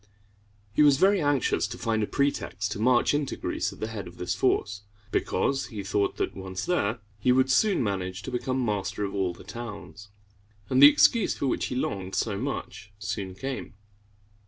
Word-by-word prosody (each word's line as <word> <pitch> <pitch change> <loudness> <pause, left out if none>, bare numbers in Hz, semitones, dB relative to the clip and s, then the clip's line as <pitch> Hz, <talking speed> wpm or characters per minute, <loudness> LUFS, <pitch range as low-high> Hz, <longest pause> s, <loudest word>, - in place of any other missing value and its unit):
He - - +3
was 145 -2 +6
very 195 +3 +4
anxious 145 -8 +1
to 115 +3 -7
find 115 -2 0
a 105 - 0
pretext 105 -7 -1
to 105 - -4
march 120 +4 +3
into 145 -2 -1
Greece - - -2
at - - -13
the - - -2
head 110 -4 -6
of 85 - -12
this 90 0 -2
force, 100 -2 0 0.3
because 135 +8 0
he 105 -5 -6
thought 100 0 0
that, - - -2
once 95 -1 -5
there, 115 -11 0 0.2
he 125 - +3
would 130 +1 +3
soon 200 - +3
manage 95 -2 -3
to - - -6
become 130 +1 -1
master 105 -1 -2
of 100 - -3
all 95 -3 0
the 85 - -12
towns. 105 -4 -8 0.6
And 130 +1 +4
the 145 - +12
excuse 225 +7 +3
for - - -2
which 130 - 0
he - - -4
longed 95 -6 -3
so 110 -3 0
much 100 - -5
soon 100 -3 -4
came. 130 +1 -5
110 Hz, 190 wpm, -27 LUFS, 100-130 Hz, 0.6 s, the